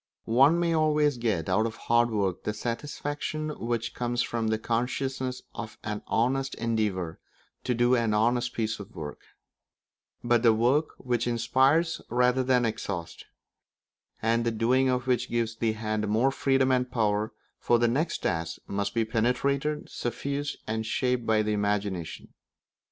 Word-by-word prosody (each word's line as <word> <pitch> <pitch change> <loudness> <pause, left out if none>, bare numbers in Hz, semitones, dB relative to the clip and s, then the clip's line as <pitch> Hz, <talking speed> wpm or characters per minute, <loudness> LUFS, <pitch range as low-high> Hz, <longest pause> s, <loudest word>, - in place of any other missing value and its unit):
One 135 +9 +5
may 170 -1 +1
always 150 -4 +2
get 110 -9 0
out 105 +4 +2
of 115 - -7
hard 120 0 +2
work 100 -5 -1
the 105 - -2
satisfaction 145 +6 -3
which 120 -5 -3
comes 120 0 -1
from 115 -1 -2
the 110 0 +1
consciousness 130 +3 -2
of 110 -2 -7
an 105 -1 -3
honest 135 +4 0
endeavour 105 -7 -1 0.5
to 125 - +1
do 120 +1 +3
an 115 -3 +2
honest 120 +3 +2
piece 110 -1 -1
of 100 +2 -10
work; 75 -4 -6 1.0
but 120 -1 +3
the 115 -2 +5
work 130 +7 +2
which 120 -2 -1
inspires 130 +8 +2
rather 125 +2 +3
than 125 -1 +3
exhausts, 100 -6 -4 1.0
and 115 +1 +2
the 115 - +1
doing 125 +4 +2
of 125 -1 0
which 125 -1 0
gives 115 -1 -1
the 115 -1 +1
hand 110 -1 -2
more 115 +6 +2
freedom 135 -1 +2
and 125 -1 +1
power 105 -2 +1 0.3
for 120 - +3
the 120 0 +3
next 150 +8 -1
tasks 80 0 -1
must 100 +1 -3
be 115 -1 +2
penetrated, 140 +7 0
suffused, 140 +4 -3
and 110 +1 -2
shaped 125 -1 0
by 110 -1 +3
the 105 0 0
imagination. 100 -4 -2
120 Hz, 155 wpm, -27 LUFS, 110-130 Hz, 1.0 s, One